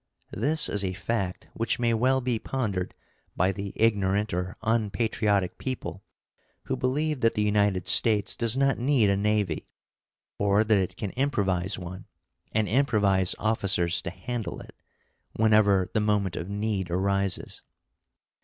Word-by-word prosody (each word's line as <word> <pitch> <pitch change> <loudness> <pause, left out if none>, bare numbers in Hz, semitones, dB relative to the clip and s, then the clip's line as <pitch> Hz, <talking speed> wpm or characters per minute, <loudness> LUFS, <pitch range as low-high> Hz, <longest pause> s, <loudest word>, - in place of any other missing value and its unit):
This 155 +2 +3
is 100 -1 +1
a 95 -1 -2
fact 95 -1 -3
which 115 0 -1
may 120 -1 +1
well 130 +4 +2
be 120 -3 -1
pondered 100 -10 -3 0.4
by 90 +2 +2
the 100 0 -6
ignorant 105 -2 +1
or 90 +1 -3
unpatriotic 105 -3 0
people 130 -7 -5 0.6
who - - -2
believe 140 +3 -1
that 115 - +2
the 105 - +1
United 100 -3 +1
States 105 0 +3
does 115 +1 +2
not 135 -2 +2
need 120 -5 +3
a - - +2
navy, 100 -4 -1 0.7
or 100 +1 +3
that 110 -2 +3
it 95 - -3
can 100 -3 -4
improvise 100 -9 0
one, 90 +1 -8 0.5
and 110 -1 0
improvise 100 -7 +2
officers 100 -5 +1
to - - -5
handle 110 +1 -5
it, - - -13 0.6
whenever 105 -4 +3
the 110 - +2
moment 105 -4 0
of 85 - -5
need 100 -3 -2
arises. 100 +1 -1
105 Hz, 145 wpm, -26 LUFS, 95-115 Hz, 0.7 s, This